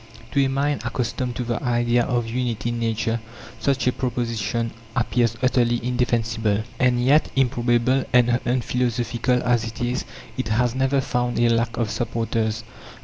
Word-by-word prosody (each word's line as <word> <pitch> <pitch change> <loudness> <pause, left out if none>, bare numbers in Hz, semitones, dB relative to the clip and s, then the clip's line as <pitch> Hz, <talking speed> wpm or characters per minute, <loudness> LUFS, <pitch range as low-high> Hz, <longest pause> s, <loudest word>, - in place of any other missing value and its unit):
To 140 - +3
a 135 - +1
mind 140 +2 0
accustomed 125 +1 -2
to 125 - -2
the 120 +1 -2
idea 120 -2 +2
of 120 -1 0
unity 120 -1 -2
in 120 0 -2
nature, 115 0 0 0.4
such 140 -1 +1
a 125 - +4
proposition 115 -2 -2 0.2
appears 115 0 +1
utterly 120 -2 +3
indefensible. 115 -4 0 0.2
And 125 -1 +3
yet, 145 +4 +4
improbable 125 0 +2
and 120 -1 +4
unphilosophical 125 0 0
as 120 -2 +2
it 115 0 -6
is, 125 +1 -1 0.3
it 130 - -1
has 115 +2 +1
never 135 +1 +1
found 125 -1 -1
a 120 0 +4
lack 115 0 +1
of 115 -3 -1
supporters. 115 -1 -1
120 Hz, 150 wpm, -23 LUFS, 115-125 Hz, 0.4 s, a